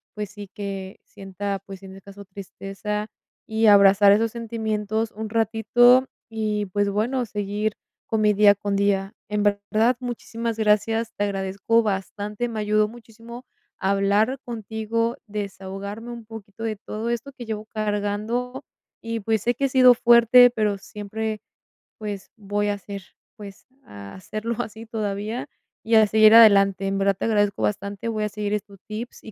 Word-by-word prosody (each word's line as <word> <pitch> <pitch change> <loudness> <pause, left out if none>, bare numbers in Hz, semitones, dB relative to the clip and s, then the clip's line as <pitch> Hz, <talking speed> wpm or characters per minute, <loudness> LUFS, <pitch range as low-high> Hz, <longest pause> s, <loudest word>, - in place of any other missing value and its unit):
pues, 210 -2 -4
sí 205 -1 -9
que 195 -1 -7
sienta, 195 +1 -5
pues, 195 -1 -10
en 190 - -10
ese 195 0 -12
caso 200 +1 -12
tristeza 195 +2 -6 0.4
y 220 0 +1
abrazar 200 0 +7
esos 225 +2 +1
sentimientos 220 -1 -3
un 220 +1 -6
ratito 230 +3 +4 0.2
y, 215 -2 -2
pues, 205 +2 0
bueno, 240 +5 -1
seguir 210 0 -2 0.3
con 220 -1 0
mi 210 0 +4
día 205 0 +6
con 200 0 -3
día. 195 0 0 0.2
En 210 -1 0
verdad 210 +4 +1
muchísimas 230 -2 -4
gracias, 225 +1 +1
te 205 - -1
agradezco 200 +3 0
bastante. 205 +2 -3
Me 220 - -4
ayudó 210 0 +2
muchísimo 235 +2 -12 0.3
hablar 200 +6 +1
contigo, 230 0 -3
desahogarme 200 +2 -6
un 235 -1 -9
poquito 220 -1 -10
de 220 -1 -2
todo 215 +3 -5
esto 235 +4 -3
que 245 -2 -9
llevo 215 -1 -5
cargando 215 +5 -3 0.4
y, 230 0 -4
pues, 220 0 0
sé 240 - +2
que 275 - -1
he - - 0
sido 255 -1 +7
fuerte, 240 +1 +7
pero 215 -4 -1
siempre, 215 +2 -5 0.6
pues, 205 -2 -6
voy 205 -1 -2
a 205 - -1
ser, 200 0 -8 0.4
pues, 200 -2 -12 0.2
a 100 -1 -11
serlo 215 - -4
así 220 -1 -8
todavía 215 +3 -3 0.4
y 225 +1 +2
a 220 -1 +7
seguir 215 +1 +6
adelante. 200 -3 +6
En 195 - -1
verdad 195 0 +2
te - - -6
agradezco 205 -3 +1
bastante. 200 +2 -2
Voy 215 -1 -1
a - - -2
seguir 210 0 -3
estos 205 -1 -5
tips 220 +3 -7
y 220 - -10
210 Hz, 160 wpm, -23 LUFS, 200-225 Hz, 0.6 s, abrazar